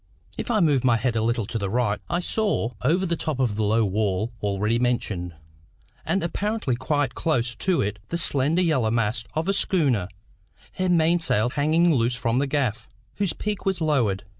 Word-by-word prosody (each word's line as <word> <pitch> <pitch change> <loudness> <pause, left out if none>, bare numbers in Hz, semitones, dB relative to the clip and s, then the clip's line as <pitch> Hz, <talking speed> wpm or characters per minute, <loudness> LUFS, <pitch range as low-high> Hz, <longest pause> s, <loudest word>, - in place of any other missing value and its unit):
If - - -5
I 220 -3 +2
moved 145 -6 +3
my 120 -3 +4
head 115 +1 -1
a 110 - +1
little 115 0 0
to 115 +2 -4
the 100 -2 -2
right, 110 -1 0
I 175 - 0
saw, 200 - 0
over 170 - +2
the 170 -2 0
top 150 -3 -3
of 120 -6 +1
the 110 - -2
low 110 +2 +2
wall 105 +2 -1
already 105 +3 0
mentioned, 100 -8 -1 0.7
and 195 - 0
apparently 200 - -1
quite 130 +1 -1
close 125 -7 0
to 185 - 0
it 105 +1 -3
the 170 - -2
slender 155 +2 +2
yellow 135 -10 +2
masts 115 0 -1
of 160 +3 -1
a 195 - +2
schooner, 145 - +1 0.7
her 185 0 -1
mainsail 165 -9 +2
hanging 160 +4 +3
loose 120 -2 +1
from 125 0 0
the 140 - 0
gaff, 125 -6 -1 0.3
whose 200 -4 0
peak 210 -1 -4
was 190 -2 -1
lowered. 125 - +1
130 Hz, 190 wpm, -24 LUFS, 110-165 Hz, 0.7 s, my